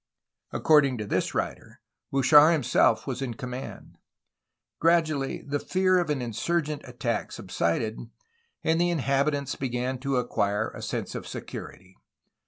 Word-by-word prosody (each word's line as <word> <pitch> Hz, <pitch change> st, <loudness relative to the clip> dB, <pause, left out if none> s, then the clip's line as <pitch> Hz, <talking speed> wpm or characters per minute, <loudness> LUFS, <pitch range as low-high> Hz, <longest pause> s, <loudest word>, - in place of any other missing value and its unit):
According 140 Hz, -5 st, +3 dB
to 105 Hz, -, -4 dB
this -, -, -1 dB
writer, -, -, -4 dB, 0.3 s
Bouchard 145 Hz, +4 st, +6 dB
himself 120 Hz, -6 st, +2 dB
was 130 Hz, -1 st, -4 dB
in 125 Hz, -4 st, -3 dB
command. 125 Hz, +2 st, -8 dB, 0.8 s
Gradually 155 Hz, -4 st, +1 dB
the 145 Hz, 0 st, -2 dB
fear 185 Hz, +2 st, +2 dB
of 175 Hz, -3 st, -1 dB
an 140 Hz, -4 st, -1 dB
insurgent 150 Hz, +6 st, -1 dB
attack -, -, -3 dB
subsided, 110 Hz, +7 st, -2 dB, 0.6 s
and 165 Hz, +1 st, +2 dB
the 175 Hz, -, +3 dB
inhabitants 140 Hz, -2 st, 0 dB
began 125 Hz, 0 st, -2 dB
to 135 Hz, 0 st, -1 dB
acquire 110 Hz, -3 st, 0 dB
a -, -, -9 dB
sense -, -, -4 dB
of -, -, -6 dB
security. 95 Hz, +1 st, -9 dB
135 Hz, 130 wpm, -27 LUFS, 125-155 Hz, 0.8 s, Bouchard